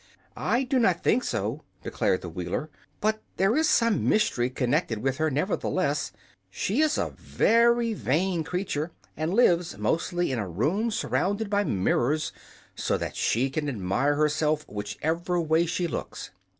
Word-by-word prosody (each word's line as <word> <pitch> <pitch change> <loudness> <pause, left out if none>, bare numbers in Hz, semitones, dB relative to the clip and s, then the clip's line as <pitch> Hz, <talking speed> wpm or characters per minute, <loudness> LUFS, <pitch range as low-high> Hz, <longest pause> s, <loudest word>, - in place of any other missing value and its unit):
"I 245 +3 +1
do 260 0 +1
not 185 -7 +2
think 250 - +3
so," 110 - -2 0.2
declared 95 - 0
the 90 - -6
Wheeler. 90 - -4 0.3
"But 215 +1 +1 0.2
there 195 +5 +3
is 315 +1 +3
some 230 -3 +3
mystery 125 - +2
connected 125 -3 0
with 130 +4 -1
her, 155 0 +1
nevertheless. 150 -1 -1 0.4
She 205 - 0
is 310 -1 +2
a - - -1
very 235 0 +2
vain 170 0 0
creature, 175 -2 -2 0.3
and 155 +2 -2
lives 175 -6 +3
mostly 175 0 0
in 125 - -1
a 100 -4 -3
room 160 - 0
surrounded 205 0 -1
by 205 0 +2
mirrors, 120 - +1 0.4
so - - -1
that - - -5
she 130 +4 +1
can 150 +1 -2
admire 120 +6 0
herself 150 0 +1
whichever 160 - -2
way 165 +1 +2
she 175 +1 -1
looks." 170 - -5
160 Hz, 150 wpm, -27 LUFS, 135-200 Hz, 0.4 s, think